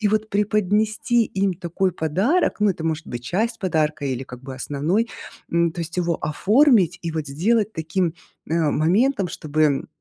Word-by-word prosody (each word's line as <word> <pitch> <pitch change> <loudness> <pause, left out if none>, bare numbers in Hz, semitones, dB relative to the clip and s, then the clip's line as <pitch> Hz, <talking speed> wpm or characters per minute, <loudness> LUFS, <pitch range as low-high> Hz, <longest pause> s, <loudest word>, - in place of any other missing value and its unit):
И 210 - +2
вот 215 +1 0
преподнести 215 +3 +1
им 195 -2 -1
такой 180 +1 -1
подарок, 190 - +1
ну, 210 - +4
и - - +1
это 160 - -8
может 160 -1 -2
быть 120 0 -6
часть 225 - -1
подарка 155 -5 0
или 130 -1 -2
как 125 0 -11
бы 135 - -7
основной, 155 - -1 0.4
м, 170 0 +2
то 170 - -6
есть 165 +1 -6
его 170 -2 0
оформить 195 - +3
и 170 - -2
вот 155 -2 -3
сделать 210 +9 +1
таким, 160 +2 -1 0.4
э, 160 - -1
моментом, 180 - +2
чтобы, 155 -3 0
175 Hz, 175 wpm, -22 LUFS, 155-210 Hz, 0.4 s, ну